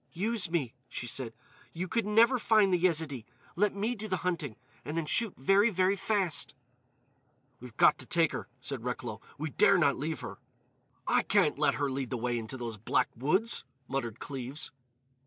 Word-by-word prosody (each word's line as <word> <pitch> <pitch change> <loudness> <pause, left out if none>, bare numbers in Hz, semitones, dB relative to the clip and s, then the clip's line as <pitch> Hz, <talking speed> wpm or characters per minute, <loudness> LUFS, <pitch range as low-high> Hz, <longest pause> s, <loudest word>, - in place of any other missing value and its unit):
"Use 205 +1 0
me," 150 -9 -1 0.2
she - - -5
said. 120 0 -3 0.4
"You 180 +3 -3
could 225 +3 0
never 230 +4 +5
find 215 -4 +4
the 180 - +3
Yezidee. 160 -8 +1 0.3
Let 205 +3 +2
me 215 +4 0
do 215 -2 -6
the 185 -4 -2
hunting; 160 -10 -1 0.3
and 150 +3 -4
then 165 - 0
shoot 220 +6 +1
very, 195 - +4
very 185 -1 +2
fast." 190 -8 -1 1.0
"We've 120 -2 -12
got - - +5
to 130 - -9
take 165 -2 +3
her," - - -5
said 125 -1 -5
Recklow. 120 -3 -4 0.2
"We 155 +1 -4
dare 200 - +5
not 140 -5 +3
leave 155 0 -3
her." - - -7 0.7
"I - - +3
can't 185 -9 +2
let 150 - +3
her 140 -1 -1
lead 130 -1 -3
the 125 - -2
way 120 0 -1
into 115 +4 -7
those 115 -3 -5
black 105 - +1
woods," 185 - +1 0.2
muttered 120 -5 -3
Cleves. 135 +1 -5
160 Hz, 180 wpm, -30 LUFS, 130-195 Hz, 1.0 s, never